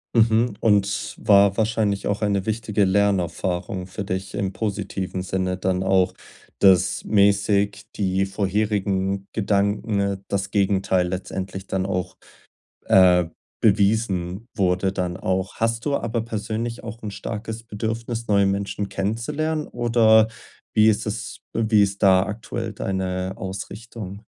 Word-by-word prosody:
Mhm. 115 0 +3
Und 100 -2 +1
war 100 -1 +4
wahrscheinlich 110 -3 0
auch 100 +1 -1
eine 100 -2 0
wichtige 110 -1 0
Lernerfahrung 95 -1 0
für 100 +2 -5
dich 95 0 -4
im 95 -1 -2
positiven 95 -3 -3
Sinne 95 0 -1
dann 95 0 0
auch, 95 -1 +2 0.5
dass 95 -1 +4
mäßig 100 0 +2
die 95 -1 0
vorherigen 100 -1 -1
Gedanken, 100 0 0
äh, 100 0 0
das 100 0 -2
Gegenteil 95 -2 +2
letztendlich 95 +1 -5
dann 95 -1 -2
auch, 90 -1 -3 0.7
äh, 90 -2 +6 0.3
bewiesen 100 -1 +1
wurde, 95 -1 +1
dann 90 -2 -2
auch. 95 +1 -2
Hast 115 +1 -1
du 145 - 0
aber 115 0 -2
persönlich 115 +1 -4
auch 115 0 -8
'n 105 - -4
starkes 110 +2 -5
Bedürfnis, 115 +2 -4
neue 100 -2 +3
Menschen 100 +1 -2
kennenzulernen, 130 +11 -2
oder 115 -2 +4 0.5
wie 110 0 +6
ist 110 - +1
das - - -4 0.2
wie 110 -2 +3
ist 100 +1 -5
da 95 -2 +6
aktuell 105 +3 -5
deine 95 -1 -2
Ausrichtung? 100 +1 -7
100 Hz, 130 wpm, -23 LUFS, 95-110 Hz, 0.7 s, äh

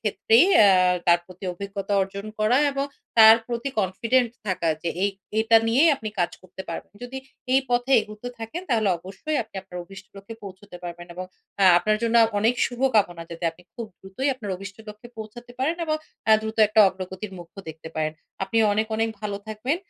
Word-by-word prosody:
ক্ষেত্রেই 225 - +4 0.2
আ - - +7 0.4
তার 175 0 +6
প্রতি 185 +1 -12
অভিজ্ঞতা 200 +2 -5
অর্জন 195 +2 -6
করা, 215 +5 +3
এবং 275 0 -1 0.3
তার 220 0 +10
প্রতি 235 +3 -3
কনফিডেন্ট 230 +6 +1 0.2
থাকা 180 -3 -1
যে, 170 - -1
এই 200 - +2 0.3
এটা 225 +1 +5
নিয়েই 275 +8 +5
আপনি 220 -5 -6
কাজ 175 - +1
করতে 185 0 -10
পারবেন। 165 - -7
যদি 260 +2 -6 0.3
এই 265 - +5
পথে 245 +2 +1
এগুতে 215 +3 -8
থাকেন, 230 +11 -6
তাহলে 220 -3 +2
অবশ্যই, 195 - -5
আপনি 215 - -25
আপনার 180 -2 -9
অভিষ্ট 195 +2 -13
লক্ষ্যে 200 +3 -10
পৌঁছুতে 195 -1 -11
পারবেন। 175 0 -7
এবং 185 +1 -5 0.4
আ - - +6
আপনার 215 +4 +1
জন্য 230 0 0
আ - - +5
অনেক 225 +4 +2
শুভকামনা, 220 -9 +1
যাতে 170 0 -7
আপনি 165 +2 -20
খুব 230 -2 -6
দ্রুতই 195 +9 -3
আপনার 210 -6 -7
অভিষ্ট 190 0 -9
লক্ষ্যে 210 +3 -11
পৌঁছাতে 240 +3 -9
পারেন 310 +6 0
এবং 310 0 +1 0.3
অ্যা 220 - +6
দ্রুত, 220 +1 -5
একটা 215 +1 +3
অগ্রগতির 190 +2 -7
মুখও 175 +3 -11
দেখতে 160 0 -9
পারেন। 155 0 -1 0.3
আপনি 225 +4 -1
অনেক, 220 +2 0
অনেক 225 0 +1
ভালো 205 -2 -3
থাকবেন। 230 +8 -2
210 Hz, 185 wpm, -24 LUFS, 190-230 Hz, 0.4 s, তার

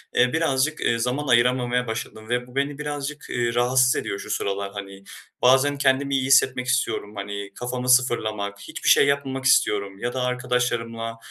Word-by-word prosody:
eee, 125 +3 +3
birazcık, 155 -2 0
eee, 115 - +1
zaman 125 +5 -2
ayıramamaya 125 0 +2
başladım 110 -1 -6
ve 125 0 -1
bu 125 - -16
beni 140 +1 -1
birazcık, 150 0 -5
eee, 120 -1 -1
rahatsız 125 +1 +3
ediyor 100 - -3
şu - - -9
sıralar, 100 -1 -2
hani. 100 -1 -9 0.4
Bazen 135 +3 +4
kendimi 140 0 +1
iyi 130 -1 0
hissetmek 130 -1 +3
istiyorum, 115 -4 -1
hani, 100 0 -6
kafamı 125 +1 -4
sıfırlamak, 110 -5 +1
hiçbir - - -3
şey - - +6
yapmamak 135 -1 -1
istiyorum 100 -7 +2
ya 120 +2 -3
da 130 - -2
arkadaşlarımla 120 -2 -2
125 Hz, 165 wpm, -23 LUFS, 115-135 Hz, 0.4 s, şey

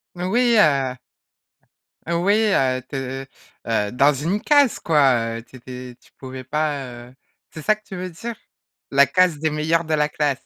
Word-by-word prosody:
Moui, 230 +7 +2
heu! 135 -6 +3 1.1
Heu 170 - 0
oui, 200 - +4 0.2
heu, 130 -1 +1
tu - - -7
es, 135 0 -4
heu, - - -16 0.4
heu, 105 -2 0
dans 140 +4 +4
une 165 +10 -2
case 285 -4 +3
quoi. 125 -7 +2
Heu, 115 - -9
tu 130 - -18
étais 125 0 -9
tu - - -24
pouvais 130 -1 -8
pas, 150 +1 -2 0.3
heu - - -19 0.4
c'est 155 - -8
ça 215 +7 +3
que 215 - -25
tu 190 - -8
veux 185 0 -5
dire? 230 +8 -7 0.6
La 140 0 +6
case 175 +1 +2
des 155 +1 0
meilleurs 160 +2 0
de 155 - -2
la 150 0 +2
classe. 145 -3 -1
150 Hz, 190 wpm, -22 LUFS, 130-175 Hz, 1.1 s, La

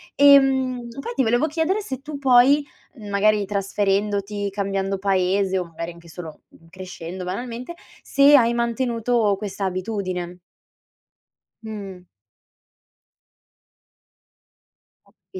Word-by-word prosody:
Ehm, 265 -3 +4
poi 475 +12 -5
ti 265 - +2
volevo 240 +7 +2
chiedere 330 +7 0
se 270 -8 -6
tu 295 0 -7
poi, 275 +2 +5 0.3
mhmm, 210 -4 -10
magari 205 +1 +2
trasferendoti, 200 0 -1
cambiando 195 -1 -2
paese 190 0 +1
o 180 - -3
magari 165 +1 -7
anche 170 0 -17
solo, 160 -2 -10
mhmm, 165 - -21
crescendo 180 0 -8
banalmente, 240 - -5 0.3
se 280 +1 +5
hai 235 -3 +4
mantenuto 235 -2 0
questa 200 -1 -4
abitudine. 185 -2 -4 1.2
Mh. 195 -4 -8 3.0
Ho - - -25 0.2
capi - - -7
205 Hz, 110 wpm, -22 LUFS, 190-250 Hz, 3.0 s, poi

